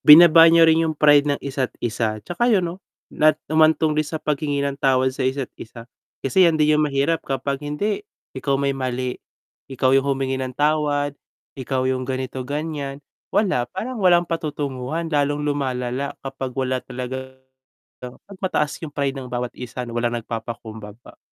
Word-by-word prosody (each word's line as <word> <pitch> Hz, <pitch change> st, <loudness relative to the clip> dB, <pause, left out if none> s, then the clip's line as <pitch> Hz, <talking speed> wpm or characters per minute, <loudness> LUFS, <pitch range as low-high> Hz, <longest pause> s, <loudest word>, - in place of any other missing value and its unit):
binaba 165 Hz, +1 st, +9 dB
niyo 165 Hz, 0 st, +6 dB
rin 160 Hz, 0 st, +5 dB
yung 155 Hz, -, -3 dB
pride 145 Hz, -1 st, +5 dB
ng 140 Hz, -, 0 dB
isa't 135 Hz, -2 st, -1 dB, 0.2 s
isa, 110 Hz, -1 st, -1 dB
'tsaka 205 Hz, +8 st, 0 dB
'yun 205 Hz, -6 st, +3 dB
'no, 175 Hz, +2 st, -5 dB, 0.3 s
na 155 Hz, -1 st, +4 dB, 0.2 s
humantong 155 Hz, 0 st, +4 dB
din 155 Hz, 0 st, 0 dB
sa 160 Hz, -, -3 dB
paghingi 145 Hz, -2 st, -1 dB
ng 140 Hz, -1 st, -3 dB
tawad 130 Hz, -1 st, +2 dB
sa 135 Hz, -, -9 dB
isa't 130 Hz, 0 st, -1 dB
isa. 115 Hz, +1 st, -10 dB, 0.4 s
Kasi 170 Hz, +7 st, +5 dB
'yan 160 Hz, -, +1 dB
din 155 Hz, 0 st, +3 dB
'yung 155 Hz, -, +3 dB
mahirap 145 Hz, +3 st, 0 dB
kapag, 135 Hz, 0 st, -2 dB
hindi, 150 Hz, -, -2 dB, 0.3 s
ikaw 140 Hz, -1 st, -1 dB
may 140 Hz, 0 st, 0 dB
mali, 130 Hz, -1 st, -3 dB, 0.5 s
ikaw 130 Hz, -1 st, +1 dB
'yung 135 Hz, +1 st, +3 dB
humingi 135 Hz, -1 st, -1 dB
ng 130 Hz, -1 st, -5 dB
tawad, 145 Hz, -1 st, +1 dB, 0.5 s
ikaw 130 Hz, 0 st, -1 dB
yung 130 Hz, 0 st, 0 dB
ganito 130 Hz, 0 st, -3 dB
ganiyan. 145 Hz, 0 st, -4 dB, 0.3 s
Wala, 180 Hz, -, +1 dB
parang 245 Hz, -, -5 dB
walang 175 Hz, -1 st, +5 dB
patutunguhan 150 Hz, -1 st, -3 dB
lalong 145 Hz, 0 st, +1 dB
lumalala 130 Hz, -2 st, -2 dB
kapag 135 Hz, -1 st, -5 dB
wala 130 Hz, -1 st, -1 dB
talagang 130 Hz, +1 st, -6 dB, 0.7 s
'pag 130 Hz, +10 st, -11 dB
mataas 150 Hz, -6 st, 0 dB
yung 150 Hz, -, -8 dB
pride 140 Hz, -1 st, -1 dB
ng 130 Hz, -2 st, -6 dB
bawat 125 Hz, 0 st, -2 dB
isa 125 Hz, 0 st, -7 dB
na 120 Hz, -, -8 dB
walang 120 Hz, 0 st, 0 dB
nagpapakumbaba. 110 Hz, -1 st, -8 dB
140 Hz, 165 wpm, -22 LUFS, 130-155 Hz, 0.7 s, binaba